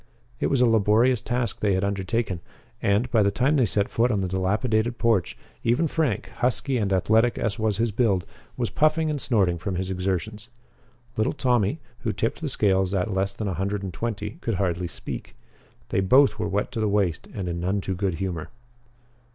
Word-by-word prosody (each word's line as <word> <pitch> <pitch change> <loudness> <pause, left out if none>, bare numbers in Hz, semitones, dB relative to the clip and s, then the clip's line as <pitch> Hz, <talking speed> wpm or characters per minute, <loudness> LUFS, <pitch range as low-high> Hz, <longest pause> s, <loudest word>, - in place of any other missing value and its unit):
It - - +1
was 135 -3 +1
a - - +6
laborious 115 +2 +3
task 120 -1 -2
they 100 -2 +2
had 95 - 0
undertaken, 100 0 -1 0.4
and, 100 +5 +2
by 115 -4 +4
the 100 - +4
time 130 +8 +1
they 130 -6 +3
set 100 +1 +2
foot 120 +2 +1
on 105 -5 +1
the 95 - -1
dilapidated 110 +5 0
porch, 110 -7 +1 0.3
even 120 +8 +2
Frank, 150 -8 -1
husky 125 +2 +1
and 100 -4 0
athletic 110 +5 +3
as 110 -2 -2
was 110 -3 0
his 115 0 +1
build, 100 -5 +1 0.3
was 120 -3 -1
puffing 155 +1 +2
and 145 -3 -2
snorting 95 -8 +1
from 95 +2 -3
his 95 +1 -2
exertions. 95 +4 -3 0.7
Little 110 - +1
Tommy, 125 -2 +1 0.2
who 120 -5 -1
tipped 115 +7 -2
the 155 - -2
scales 95 -5 +2
at 95 +2 0
less 95 +1 0
than 105 - -3
a 95 - -1
hundred 100 +2 -2
and 95 -2 -5
twenty, 105 0 -4
could 115 - -1
hardly 90 -1 -1
speak. - - -7 0.5
They - - +1
both 130 +8 +4
were 105 -1 -1
wet 100 +4 -1
to 120 - -4
the 110 -1 +1
waist 100 -5 0
and 95 -4 -3
in 85 0 -3
none 95 +4 0
too 95 0 -3
good 95 -1 -1
humor. 85 -4 -4
105 Hz, 200 wpm, -25 LUFS, 95-120 Hz, 0.7 s, a